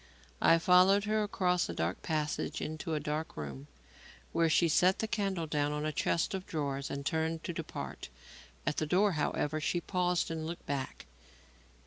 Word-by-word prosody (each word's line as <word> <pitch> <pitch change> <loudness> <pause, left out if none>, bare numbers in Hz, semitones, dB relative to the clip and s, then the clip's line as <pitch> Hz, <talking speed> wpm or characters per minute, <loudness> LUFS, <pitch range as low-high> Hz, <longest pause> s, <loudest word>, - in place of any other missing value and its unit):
I 165 - +6
followed 185 +4 +5
her 215 +1 +1
across 180 -4 +1
a - - -4
dark - - -1
passage 155 -2 -2
into 155 +1 -3
a - - 0
dark 150 +2 -3
room, 70 -2 -6 0.6
where 165 0 +2
she 170 +2 +4
set 180 +4 +4
the 220 - -1
candle 195 -6 -1
down 150 -1 0
on 150 0 -2
a 155 - 0
chest 165 +4 0
of 190 -1 -4
drawers 140 -3 -2
and 140 0 -4
turned 160 +1 -1
to 175 - -3
depart. - - -6 0.6
At - - 0
the 155 - 0
door, 195 +5 +3
however, 155 -1 -1
she 175 - 0
paused 180 -1 0
and 160 -1 -3
looked 170 +1 -6
back. 140 -2 -4
160 Hz, 175 wpm, -32 LUFS, 150-180 Hz, 0.6 s, I